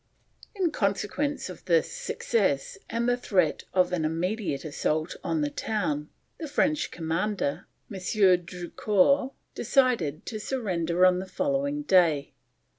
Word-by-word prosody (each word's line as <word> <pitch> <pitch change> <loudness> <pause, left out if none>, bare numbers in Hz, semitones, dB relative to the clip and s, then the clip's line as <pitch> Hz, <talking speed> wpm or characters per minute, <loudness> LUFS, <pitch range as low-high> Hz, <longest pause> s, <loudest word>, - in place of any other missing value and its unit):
In 365 -5 +1
consequence 220 +7 -1
of - - -10
this 480 -1 +2
success 225 - -1
and 230 +1 -1
the 245 - +3
threat 185 -10 +1
of 180 -1 +2
an 170 -3 0
immediate 170 0 -2
assault 155 +2 -1
on 165 -3 0
the 145 0 -1
town, 150 -9 -2 0.3
the 320 - -4
French 295 +1 +1
commander, 165 -1 -2 0.3
M. 190 - -5 0.4
Drucour, 200 +9 +1 0.2
decided 235 - +1
to 215 - -5
surrender 185 -8 +1
on 180 0 +4
the 190 - -6
following 280 +7 -1
day. 170 - +3
190 Hz, 125 wpm, -27 LUFS, 165-260 Hz, 0.4 s, on